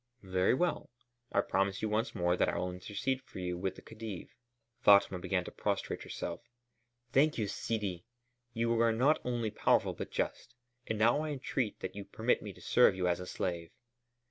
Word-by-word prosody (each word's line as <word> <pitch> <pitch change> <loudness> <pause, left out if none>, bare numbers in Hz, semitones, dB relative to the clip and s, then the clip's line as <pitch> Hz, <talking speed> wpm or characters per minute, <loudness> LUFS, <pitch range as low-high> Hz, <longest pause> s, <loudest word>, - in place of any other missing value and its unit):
"Very 95 +4 +2
well. 175 +5 0 0.4
I 100 - +3
promise 95 0 0
you 110 - +1
once 110 +4 0
more 90 -2 +2
that - - +2
I - - -2
will 90 0 -1
intercede 105 +8 -2
for 130 - -13
you 90 -1 -2
with 95 +1 -2
the - - -13
Khedive." 110 -4 -7 0.5
Fatma 100 -4 +6
began - - 0
to - - -7
prostrate - - -2
herself. 85 0 -5 0.7
"Thank 150 +3 +4
you, 110 -3 0
Sidi! 100 -3 -3 0.5
You 115 0 +1
are 115 -1 +5
not 135 +7 +3
only 120 -3 -1
powerful, - - +2
but - - -6
just. 120 - -3 0.3
And 110 - -1
now 120 +7 +4
I 155 - -2
entreat 130 -5 -2
that 95 - -5
you 100 - -5
permit 110 +4 0
me 105 - -6
to 90 - -16
serve 105 +2 +5
you 90 -1 0
as 90 0 +1
a 90 - -6
slave." 85 -3 -3
105 Hz, 190 wpm, -33 LUFS, 90-120 Hz, 0.7 s, Fatma